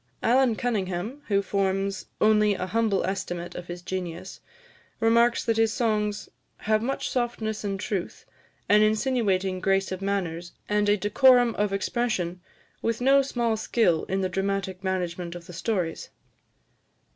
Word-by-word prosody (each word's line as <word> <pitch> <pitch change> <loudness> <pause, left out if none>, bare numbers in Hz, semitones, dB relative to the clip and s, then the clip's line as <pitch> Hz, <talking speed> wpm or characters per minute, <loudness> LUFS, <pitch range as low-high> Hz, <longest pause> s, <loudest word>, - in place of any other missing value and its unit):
Allan 250 -1 +3
Cunningham, 215 +2 -2
who 200 -2 +2
forms 195 0 -1
only 210 -1 +4
a 185 - -3
humble 215 +1 +1
estimate 175 -2 -4
of 175 0 -8
his 175 0 -7
genius, 185 0 -5 0.6
remarks 235 +1 +3
that 225 -1 +1
his 225 -1 +3
songs 210 -3 -1 0.3
"have 215 0 +1
much 265 +4 -2
softness 235 -4 -2
and 195 -1 -2
truth, 190 -2 -4 0.4
an 210 +1 +5
insinuating 215 -4 +1
grace 195 +1 +1
of 185 0 -4
manners, 180 -4 -3
and 210 0 +1
a 205 - +4
decorum 245 +3 +4
of 205 -1 0
expression, 195 -4 -1 0.4
with 230 0 -1
no 270 +2 +5
small 240 -4 -1
skill 215 -6 +1
in 190 +1 -1
the 190 - +1
dramatic 195 0 -2
management 180 -2 -3
of 175 -1 -9
the 180 - -11
stories." 175 -2 -2
200 Hz, 145 wpm, -26 LUFS, 185-225 Hz, 0.6 s, an